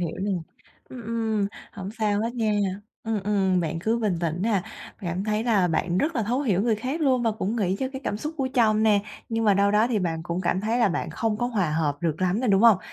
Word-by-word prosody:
hiểu 170 -3 -3
nè. 205 - -1 0.6
Ừm, 250 -2 -9
ừm. 220 -2 0 0.3
Hổng 195 -1 -6
sao 210 -1 +1
hết 230 +2 -2
nha. 220 -3 +1 0.5
Ừm, 220 -2 -1
ừm, 190 -3 +2
bạn 165 0 -2
cứ 220 +7 0
bình 205 -6 0
tĩnh 165 0 -1
nè, 210 -5 +1 0.4
cảm 180 0 -3
thấy 215 +1 0
là 205 -7 +3
bạn 175 +2 0
rất 320 +3 0
là 230 - +1
thấu 240 +5 0
hiểu 205 -9 +1
người 225 -2 +2
khác 260 +9 -3
luôn 260 -5 +2
và 230 - +2
cũng 215 +2 -2
nghĩ 190 -3 0
cho 265 - -1
cái 265 - -5
cảm 205 - -1
xúc 305 +8 -5
của 270 -3 -1
chồng 220 -4 +3
nè, 210 -2 +4 0.3
nhưng 225 0 -1
mà 205 -2 +5
đâu 200 +1 +3
đó 210 +2 +4
thì 230 -4 +1
bạn 165 -3 -2
cũng 175 +1 -3
cảm 185 0 0
thấy 225 +4 0
là 230 - +4
bạn 175 - -2
không 220 -2 -1
có 240 - 0
hòa 200 -10 0
hợp 150 -2 0
được 165 0 -1
lắm 185 +4 +1
nè, 255 - 0
đúng 195 +2 +4
hông? 225 -5 +7
210 Hz, 260 wpm, -25 LUFS, 185-230 Hz, 0.6 s, hông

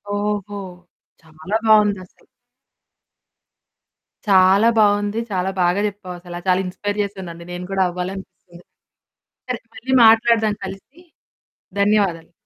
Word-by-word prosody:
ఓహో! 205 -1 -3 0.6
చాలా 160 +6 -4
బావుందసలు. 205 -4 +2 2.0
చాలా 195 +2 +5
బావుంది. 205 +1 +2
చాలా 185 0 -1
బాగా 180 +3 +2
చెప్పావు. 190 -3 -8
అసలు 175 0 -8
చాలా 185 0 +3
ఇన్స్పైర్ 205 +3 -4
చేశానండి. 185 -4 -8
నేను 175 +1 -6
గూడా 190 -1 +2
అవ్వాలనిపిస్తుంది. 180 -1 -8 0.9
సరే, 245 - -2 0.2
మళ్ళీ 260 +3 -6
మాట్లాడదాం 225 -1 +4
కలిసి. 195 - -11 0.8
ధన్యవాదాలు. 195 -6 +1
195 Hz, 95 wpm, -20 LUFS, 180-210 Hz, 2.0 s, చాలా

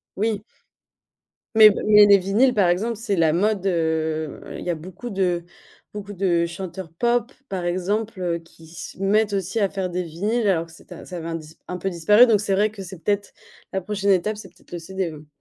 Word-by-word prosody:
Oui. 210 0 -1 1.1
Mais 215 -1 +10
b - - -3
mais 210 -1 +8
les 200 -1 +7
vinyles 210 +7 +2
par 200 -5 +3
exemple, 220 +7 0
c'est 215 -3 -1
la 160 -2 +3
mode, 195 +2 +1
heu, 160 -3 -1 0.2
il - - -7
y - - -3
a 170 - +1
beaucoup 185 +9 -9
de 180 -4 0 0.5
beaucoup 205 0 -7
de 175 -3 +1
chanteurs 180 -1 -7
pop, 240 +5 0 0.2
par 185 -2 -3
exemple, 185 -1 -1
qui 165 -1 -17
se 175 +3 -9
mettent 205 +2 +2
aussi 195 +3 -1
à 200 -2 +2
faire 190 -2 -3
des 180 +1 -2
vinyles 205 +8 -1
alors 170 -4 +2
que - - -17
c'est 160 - -18
un - - -9
ça 180 - -7
avait 165 0 -6
un 165 - -3
dis 160 0 -9
un 180 - -4
peu 195 +2 -2
disparu 210 +8 +5
donc 210 -3 +3
c'est 200 -2 -1
vrai 210 +2 +3
que 200 -2 -9
c'est 185 -2 -10
peut-être 205 -1 -1 0.4
la 190 - -1
prochaine 200 +1 0
étape, 210 +3 +1
c'est 195 -3 -10
peut-être 180 - -25
le 175 - -4
CD, 190 +1 -3
mmh. 150 -1 -12
190 Hz, 220 wpm, -23 LUFS, 170-210 Hz, 1.1 s, Mais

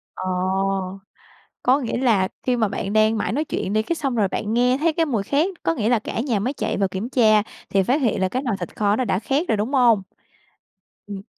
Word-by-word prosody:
Ờ. - - -6 1.4
Có 260 +3 +4
nghĩa 240 -4 -3
là 225 -7 +2 0.2
khi 250 - +1
mà 225 -3 +1
bạn 200 0 -4
đang 215 +1 +3
mải - - -1
nói 285 +7 0
chuyện 205 -9 -3
đi, 215 - +3
cái 335 - -2
xong 275 -6 -2
rồi 210 -4 +2
bạn 210 +3 -3
nghe 250 +2 +3
thấy 320 +3 +1
cái 325 +1 +1
mùi 235 -9 -1
khét, 320 - -1
có 165 - +1
nghĩa 220 +1 0
là 240 -2 +3
cả 220 - -5
nhà 235 -4 0
mới 245 +7 -1
chạy - - -2
vào 195 -1 +1
kiểm 190 +5 -5
tra, 220 -5 +4 0.3
thì 195 -1 +2
phát 265 +10 +1
hiện 225 -6 +1
là 190 - +1
cái 255 +6 -2
nồi 235 -6 -1
thịt 175 - -7
kho 205 -1 +2
nó 255 - 0
đã 190 - 0
khét 275 - -1
rồi, 220 - +1
đúng 220 +7 -2
hông? 240 -6 +4 1.1
Ừm. 200 -1 -7
230 Hz, 245 wpm, -22 LUFS, 205-260 Hz, 1.4 s, Có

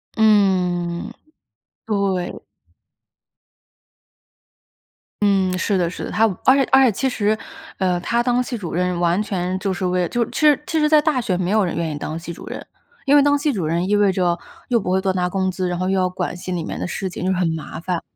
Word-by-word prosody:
嗯， 185 -5 +2 0.8
对。 200 -4 -1 2.8
嗯， 190 -2 +2
是 190 +2 0
的， 175 -2 +1
是 175 - -6
的， - - -6
她 220 - +1 0.2
而 260 - +7
且 275 - +4
而 265 0 +7
且 255 - +5
其 265 +7 -1
实， 215 -4 0 0.4
呃， 180 -2 +1
她 235 +7 0
当 245 0 +2
系 250 -1 -4
主 180 -6 -6
任 180 0 0
完 175 +3 +2
全 185 -3 -2
就 195 0 -1
是 185 0 -3
为 180 -1 +1
就 240 - +1
是 - - -13
其 - - -4
实 300 -2 +5
其 320 - -1
实 300 0 +3
在 305 0 +6
大 300 -4 +1
学 185 -6 -1
没 180 +1 -1
有 215 0 +3
人 175 - -2
愿 165 -1 -2
意 - - -4
当 155 - -4
系 170 +1 -7
主 - - -11
任， - - -7 0.4
因 280 0 +4
为 290 - +7
当 285 0 +3
系 285 0 0
主 180 -8 -2
任 170 +3 0
意 205 - +2
味 205 -1 +4
着 175 -2 0 0.3
又 240 -2 +3
不 180 - -3
会 190 - +3
多 190 0 0
拿 180 -1 0
工 190 0 0
资， 185 0 -2
然 175 - -2
后 185 +1 -1
又 190 0 +1
要 185 0 +1
管 180 -1 -4
系 180 +1 -7
里 175 -2 -2
面 - - -5
的 - - -3
事 190 +2 -3
情， 180 - -6
就 185 - 0
是 190 - 0
很 180 -2 +1
麻 160 - -7
烦。 175 0 -2
190 Hz, 250 characters per minute, -21 LUFS, 180-220 Hz, 2.8 s, 而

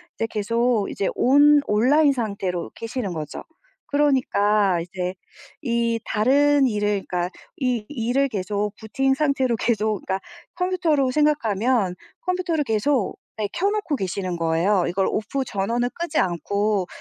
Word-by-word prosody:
이제 225 - -1
계속 230 +1 0
이제 195 - -1
온 290 +3 +5
온라인 275 +8 +4
상태로 200 -8 -3
계시는거죠. 195 - -5 0.4
그러니까 215 -10 +2
이제 180 +1 -4 0.5
이 235 -3 0
다른 280 +6 +3
일을 205 -3 0
그러니까 180 0 -1 0.3
이 250 -5 -1
일을 265 0 0
계속 205 -1 -2
Booting 270 +5 0
상태로 270 -5 +1
계속 215 -3 0
그러니까 190 0 -1 0.4
컴퓨터로 340 -8 +1
생각하면 240 -8 +1 0.3
컴퓨터를 360 -3 -1
계속, 225 0 0 0.2
네, 210 -1 -1
켜놓고 400 -5 0
계시는 185 -2 -3
거예요. 170 +4 +2
이걸' 190 +2 0
off 220 +6 -2
전원을 235 +5 -1
끄지 340 -2 -1
않고, 200 +2 0
225 Hz, 320 characters per minute, -23 LUFS, 200-275 Hz, 0.5 s, 온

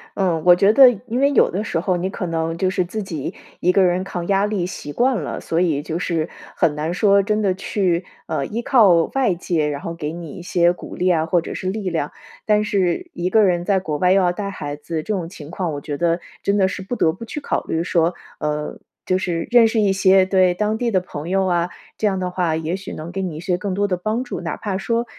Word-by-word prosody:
嗯， 180 -5 +1
我 175 0 +8
觉 195 +3 +4
得 265 +1 +9 0.2
因 240 +1 -2
为 280 +1 +4
有 - - +4
的 195 +4 -2
时 165 - -1
候 185 0 0
你 180 +2 -2
可 190 - -4
能 165 -1 -2
就 185 +2 +1
是 185 -1 0
自 210 +4 -4
己 160 -7 -5 0.3
一 180 - +3
个 195 - +4
人 180 0 +2
抗 175 -3 -4
压 195 0 +3
力 205 -4 -1
习 175 -5 -6
惯 255 - +2
了， 145 - -5
所 165 - -1
以 160 -5 +1
就 160 +3 -4
是 170 -2 -1 0.3
很 165 -3 +2
难 155 +3 -2
说 200 +1 +4
真 210 +2 0
的 195 -3 +2
去， 185 -2 -1 0.2
呃， 140 - -1
依 225 +9 -3
靠 205 -10 +5
外 255 -9 +2
界， 165 -3 -1
然 145 -1 -3
后 170 - -5
给 155 -2 -4
你 170 -3 -7
一 - - -8
些 175 -1 +2
鼓 180 - -8
励 185 - +1
啊， 160 -2 +2
或 170 +1 +2
者 - - -6
是 185 - -3
力 200 -1 -2
量。 160 -4 -2 0.4
但 210 0 +3
是 200 - 0
一 175 +1 -2
个 215 +3 +4
人 175 -3 +2
在 195 0 +2
国 155 -5 -3
外 180 +3 +3
又 195 - +4
要 180 -1 +3
带 200 +2 -4
孩 145 -7 -5
子， 155 +1 -4
这 215 - -2
种 180 -5 -2
情 160 -3 -11
况 175 -3 -2
我 145 - -5
觉 145 0 -4
得 170 +1 +1 0.2
真 200 +1 +1
的 190 -2 +4
是 195 - -5
不 195 +6 -4
得 165 -8 +3
不 185 +8 -9
去 295 - -5
考 - - -1
虑， 160 +1 -1
说， 170 0 +1 0.3
呃， 150 0 -3 0.3
就 185 - +2
是 175 -3 -2
认 235 -2 +7
识 220 0 +1
一 200 -2 +3
些， 190 -1 +5
对， 185 -1 +3
当 210 +4 -1
地 240 +1 0
的 195 -4 +2
朋 155 -3 -7
友 190 +1 +2
啊， 175 -1 +1 0.3
这 215 - +1
样 195 -2 0
的 180 -1 -2
话 175 -3 0
也 160 +2 -2
许 195 0 -8
能 160 +2 -7
给 195 +1 -3
你 175 -4 -4
一 - - -6
些 175 0 0
更 190 +1 -3
多 205 +2 +1
的 185 -2 -1
帮 215 +7 -1
助。 250 - -5
哪 - - -3
怕 200 -3 -3
说 230 +4 -1
185 Hz, 280 characters per minute, -21 LUFS, 170-200 Hz, 0.4 s, 得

